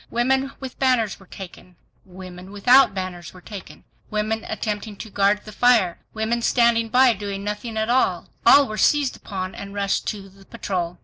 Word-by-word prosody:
Women 265 Hz, +3 st, +1 dB
with 265 Hz, -2 st, -8 dB
banners 250 Hz, -6 st, +1 dB
were 195 Hz, -, -18 dB
taken; 180 Hz, -1 st, -11 dB, 0.3 s
women 185 Hz, 0 st, -11 dB
without 245 Hz, +3 st, +5 dB
banners 185 Hz, -2 st, -6 dB
were -, -, -11 dB
taken. 200 Hz, 0 st, -10 dB, 0.3 s
Women 215 Hz, +1 st, -2 dB
attempting 215 Hz, -1 st, -4 dB
to 220 Hz, -, -9 dB
guard 200 Hz, +1 st, +2 dB
the 215 Hz, -, -9 dB
fire; 220 Hz, -6 st, +3 dB
women 225 Hz, +2 st, -1 dB
standing 235 Hz, -1 st, +2 dB
by 255 Hz, +1 st, +5 dB
doing 200 Hz, -1 st, -5 dB
nothing 210 Hz, +2 st, -4 dB
at 220 Hz, 0 st, 0 dB
all; 250 Hz, +2 st, +1 dB, 0.2 s
all 285 Hz, -1 st, +7 dB
were 215 Hz, 0 st, -5 dB
seized 290 Hz, -3 st, +2 dB
upon 185 Hz, -2 st, -6 dB
and 200 Hz, 0 st, -9 dB
rushed 200 Hz, -1 st, -1 dB
to 200 Hz, -2 st, -4 dB
the 195 Hz, 0 st, -18 dB
patrol. 180 Hz, -6 st, -4 dB
210 Hz, 175 wpm, -22 LUFS, 195-235 Hz, 0.3 s, all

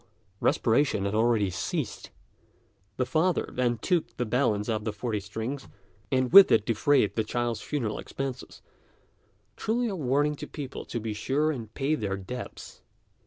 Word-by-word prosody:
respiration 115 Hz, -4 st, +2 dB
had 100 Hz, -, -1 dB
already 110 Hz, -3 st, +2 dB
ceased. 90 Hz, -, -3 dB, 0.9 s
The 125 Hz, -, +1 dB
father 160 Hz, +6 st, +1 dB
then 120 Hz, -1 st, +1 dB
took 170 Hz, +9 st, -1 dB
the 125 Hz, -, 0 dB
balance 110 Hz, -3 st, +1 dB
of 110 Hz, -2 st, -1 dB
the 110 Hz, -, -1 dB
forty 105 Hz, 0 st, -3 dB
strings, 110 Hz, +7 st, -5 dB, 0.4 s
and 130 Hz, +1 st, +1 dB
with 200 Hz, 0 st, +10 dB
it 110 Hz, -2 st, +4 dB
defrayed 115 Hz, 0 st, +2 dB
the 110 Hz, -, +1 dB
child's 120 Hz, 0 st, -2 dB
funeral 120 Hz, -8 st, -2 dB
expenses 135 Hz, -2 st, -6 dB, 0.9 s
truly 235 Hz, +2 st, 0 dB
a 200 Hz, -, -3 dB
warning 145 Hz, -1 st, +1 dB
to -, -, -7 dB
people 140 Hz, -3 st, -7 dB
to 120 Hz, -, -4 dB
be 110 Hz, -1 st, -3 dB
sure 140 Hz, +8 st, 0 dB
and 115 Hz, -7 st, -6 dB
pay 140 Hz, +2 st, 0 dB
their 100 Hz, -9 st, -1 dB
debts. 110 Hz, +6 st, -8 dB
120 Hz, 155 wpm, -28 LUFS, 110-140 Hz, 0.9 s, with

